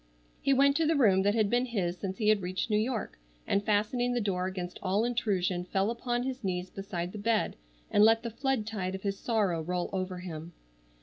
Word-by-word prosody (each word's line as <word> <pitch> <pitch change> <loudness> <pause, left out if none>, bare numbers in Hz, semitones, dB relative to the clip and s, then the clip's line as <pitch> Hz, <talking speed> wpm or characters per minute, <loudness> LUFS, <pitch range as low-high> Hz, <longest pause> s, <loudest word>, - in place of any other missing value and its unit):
He 275 - +2
went 275 +1 +5
to 325 -1 +2
the 325 - +3
room 205 -9 +5
that 205 +2 +2
had 215 -2 +3
been 245 +4 +1
his 185 -7 -1
since 190 +1 -5
he 215 -2 +2
had 215 -2 +4
reached 185 +4 -3
New 210 - +4
York, 225 - -2 0.3
and 200 - +1
fastening 225 +4 +1
the - - +2
door 185 -4 -1
against 180 -1 -5
all 200 +4 +1
intrusion 195 -7 0
fell 195 +4 0
upon 240 +1 -2
his 260 -1 -4
knees 180 -1 -2
beside 180 -3 -4
the 210 - -7
bed, 220 +1 +1 0.4
and 205 - +5
let 225 +1 +5
the 235 - -4
flood 260 -1 -1
tide 190 -4 -3
of 190 - -8
his 200 -1 -2
sorrow 205 -8 +1
roll 180 +2 -2
over 185 -1 -2
him. 170 -2 -7
205 Hz, 220 wpm, -30 LUFS, 185-235 Hz, 0.4 s, went